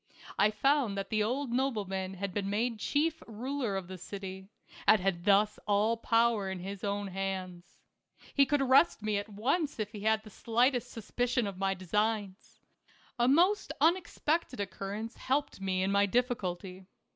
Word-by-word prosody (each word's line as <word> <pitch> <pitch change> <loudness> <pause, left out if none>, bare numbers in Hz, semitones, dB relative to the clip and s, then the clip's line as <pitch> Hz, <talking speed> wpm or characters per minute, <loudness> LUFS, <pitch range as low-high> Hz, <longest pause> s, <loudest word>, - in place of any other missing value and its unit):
I 205 +2 +5
found 240 -1 +1
that 195 - -4
the 215 -1 +2
old 250 +4 -1
nobleman 200 -7 -1
had 195 0 -4
been 200 0 -2
made 225 +2 -1
chief 315 +7 0
ruler 240 0 -3
of 190 -2 -5
the 185 0 -8
city, 190 0 -7 0.4
and 215 - +7
had 180 -2 -1
thus 210 +1 +3
all 210 +3 +3
power 230 -3 +2
in 190 - -4
his 195 +2 -7
own 200 -1 -2
hands. 185 -2 -5 0.6
He 275 -1 +4
could 290 -2 +2
arrest 265 -2 +4
me 210 -1 +1
at 205 +2 -7
once 275 - -1
if 210 -2 -3
he 215 - -8
had 220 +1 +1
the 215 - -13
slightest 240 +3 +1
sus 225 -3 -10
picion 245 -2 +1
of 195 -2 -6
my 195 0 +1
designs.. 205 +2 -2 0.6
A 240 - +4
most 355 +10 +3
unexpected 330 - +1
occur 195 0 -4
rence 225 +2 -6
helped 270 -5 -1
me 185 -1 0
in 195 - 0
my 200 0 +3
difficulty. 190 -6 -2
210 Hz, 170 wpm, -31 LUFS, 195-245 Hz, 0.6 s, and